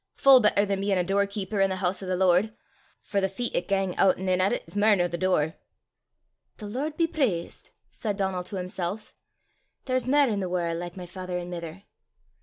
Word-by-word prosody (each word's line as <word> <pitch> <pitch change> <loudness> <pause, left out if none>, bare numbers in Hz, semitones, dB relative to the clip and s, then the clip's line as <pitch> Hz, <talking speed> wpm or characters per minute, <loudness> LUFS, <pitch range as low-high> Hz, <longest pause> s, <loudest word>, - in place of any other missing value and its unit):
full 270 -1 +7
better 210 -2 +3
than 195 -1 -2
bein' 195 -1 +1
a 180 - +2
door 200 +2 +1
keeper 200 0 -3
i' 195 - +5
the 190 -1 -3
hoose 185 +1 -1
o' 190 - -6
the 185 - 0
Lord! 190 +4 +2 0.5
For 200 - -1
the 190 - +1
feet 240 +5 -3
'at 175 - -1
gang 195 -2 0
oot 190 -1 +4
an' 190 - -5
in 185 0 +2
at 190 - +2
it - - -3
's 165 - -12
mair 210 +1 +5
nor 175 -2 +1
the 170 - -5
door!" 170 -4 0 1.0
"The 215 - -9
Lord 275 +9 -4
be 335 - +3
praist!" 245 - -2 0.2
said 210 -4 -4
Donal 190 -2 -1
to 195 - -7
himself; 185 +2 -4 0.7
"there's 255 -2 -1
mair 280 -2 +4
i' - - 0
the 190 -2 -2
warl' 175 -2 -1
like 175 +2 -6
my 180 - -6
father 180 0 -5
an' 175 0 -6
mither!" 170 +2 -7
190 Hz, 220 wpm, -26 LUFS, 180-210 Hz, 1.0 s, full